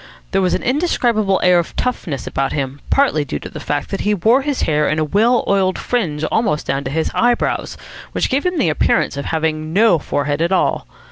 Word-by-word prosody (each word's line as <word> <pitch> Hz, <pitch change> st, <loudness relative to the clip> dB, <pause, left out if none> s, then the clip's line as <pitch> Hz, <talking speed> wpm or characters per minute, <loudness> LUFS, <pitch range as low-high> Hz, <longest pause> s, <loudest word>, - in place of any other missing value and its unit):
There 195 Hz, -, +2 dB
was 185 Hz, -, +1 dB
an -, -, -4 dB
indescribable 240 Hz, -, +1 dB
air 180 Hz, -1 st, +5 dB
of 170 Hz, -, -4 dB
toughness 175 Hz, -, -3 dB
about 135 Hz, 0 st, -2 dB
him, 140 Hz, -1 st, -3 dB
partly 270 Hz, -, +2 dB
due 140 Hz, -, -4 dB
to -, -, -8 dB
the 155 Hz, -, -8 dB
fact 145 Hz, 0 st, -3 dB
that 195 Hz, -, -2 dB
he 210 Hz, 0 st, +1 dB
wore 225 Hz, +8 st, +3 dB
his 285 Hz, -1 st, -2 dB
hair 150 Hz, -1 st, +1 dB
in 155 Hz, -, 0 dB
a 155 Hz, -, +1 dB
well 225 Hz, +10 st, +2 dB
oiled 190 Hz, -2 st, +1 dB
fringe 165 Hz, -12 st, -2 dB
almost 180 Hz, -10 st, 0 dB
down 135 Hz, +1 st, -1 dB
to -, -, -2 dB
his 160 Hz, +3 st, -1 dB
eyebrows, 240 Hz, 0 st, 0 dB, 0.3 s
which -, -, 0 dB
gave 275 Hz, +2 st, 0 dB
him 360 Hz, -1 st, -1 dB
the 180 Hz, -, +2 dB
appearance 150 Hz, -, +1 dB
of 140 Hz, -, -5 dB
having 155 Hz, -1 st, -2 dB
no 210 Hz, -3 st, +4 dB
forehead 145 Hz, +1 st, -2 dB
at 170 Hz, +2 st, +1 dB
all. 185 Hz, -, +1 dB
175 Hz, 215 wpm, -18 LUFS, 150-230 Hz, 0.3 s, air